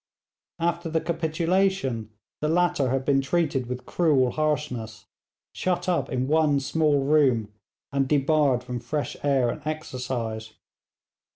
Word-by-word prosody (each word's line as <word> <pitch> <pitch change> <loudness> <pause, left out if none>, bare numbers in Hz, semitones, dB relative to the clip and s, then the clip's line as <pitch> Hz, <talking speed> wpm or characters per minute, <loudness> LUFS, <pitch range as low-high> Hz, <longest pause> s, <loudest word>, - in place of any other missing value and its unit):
After 170 0 -1
the 160 0 +1
capitulation 165 - 0 0.3
the 150 - -1
latter 175 -5 +2
had 130 +1 -1
been 140 -1 +3
treated 140 -3 0
with 125 0 -5
cruel 140 -7 +2
harshness, 125 -9 -2 0.5
shut 180 -1 -1
up 180 -2 0
in 130 0 -1
one 150 -1 +3
small 145 0 +1
room, 130 -8 +2 0.4
and 135 0 +1
debarred 140 -3 +2
from 125 -1 -4
fresh 145 +5 -3
air 135 -4 +2
and - - -7
exercise. 125 -7 -4
145 Hz, 125 wpm, -25 LUFS, 125-160 Hz, 0.5 s, been